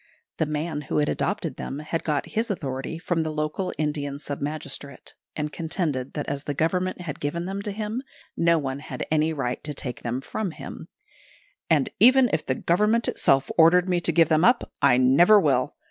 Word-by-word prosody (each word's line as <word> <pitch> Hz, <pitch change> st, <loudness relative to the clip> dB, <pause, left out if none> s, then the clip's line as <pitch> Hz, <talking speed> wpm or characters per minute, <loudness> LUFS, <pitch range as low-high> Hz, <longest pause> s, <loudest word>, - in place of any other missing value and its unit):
The 160 Hz, -, 0 dB
man 150 Hz, 0 st, -2 dB
who -, -, 0 dB
had 150 Hz, 0 st, +2 dB
adopted 175 Hz, -9 st, -2 dB
them 135 Hz, -, -5 dB
had 155 Hz, +2 st, -3 dB
got 150 Hz, -3 st, -1 dB
his 225 Hz, +2 st, -1 dB
authority 135 Hz, -5 st, -3 dB
from 170 Hz, 0 st, -1 dB
the 160 Hz, -, -2 dB
local 155 Hz, +4 st, -2 dB
Indian 145 Hz, -2 st, -2 dB
sub 145 Hz, -1 st, -6 dB
magistrate; 140 Hz, -2 st, -6 dB, 0.2 s
and 150 Hz, -1 st, -3 dB
contended 155 Hz, -6 st, -2 dB
that 150 Hz, -, -4 dB
as 140 Hz, 0 st, -4 dB
the 145 Hz, -, -3 dB
Government 180 Hz, +4 st, 0 dB
had 155 Hz, -5 st, -6 dB
given 170 Hz, +4 st, -2 dB
them 195 Hz, +2 st, -4 dB
to 205 Hz, -, -4 dB
him, 215 Hz, +4 st, -3 dB, 0.3 s
no 170 Hz, 0 st, +3 dB
one 135 Hz, -2 st, -3 dB
had 150 Hz, -, -6 dB
any 155 Hz, +1 st, +2 dB
right 130 Hz, -5 st, -3 dB
to 150 Hz, -1 st, -5 dB
take 125 Hz, -3 st, -6 dB
them 120 Hz, +1 st, -2 dB
from 195 Hz, +9 st, -3 dB
him; -, -, -8 dB, 0.8 s
"and 150 Hz, -4 st, +2 dB
even 255 Hz, +2 st, +6 dB
if 160 Hz, -, +1 dB
the 130 Hz, -, -1 dB
Government 210 Hz, -, +2 dB
itself 135 Hz, 0 st, +2 dB
ordered 175 Hz, +3 st, +6 dB
me 180 Hz, -1 st, +2 dB
to 170 Hz, -, 0 dB
give 165 Hz, -1 st, +4 dB
them 155 Hz, 0 st, +3 dB
up, 240 Hz, +3 st, +3 dB
I 140 Hz, -3 st, +5 dB
never 140 Hz, +12 st, +6 dB
will. 145 Hz, -4 st, +1 dB
155 Hz, 195 wpm, -25 LUFS, 140-180 Hz, 0.8 s, even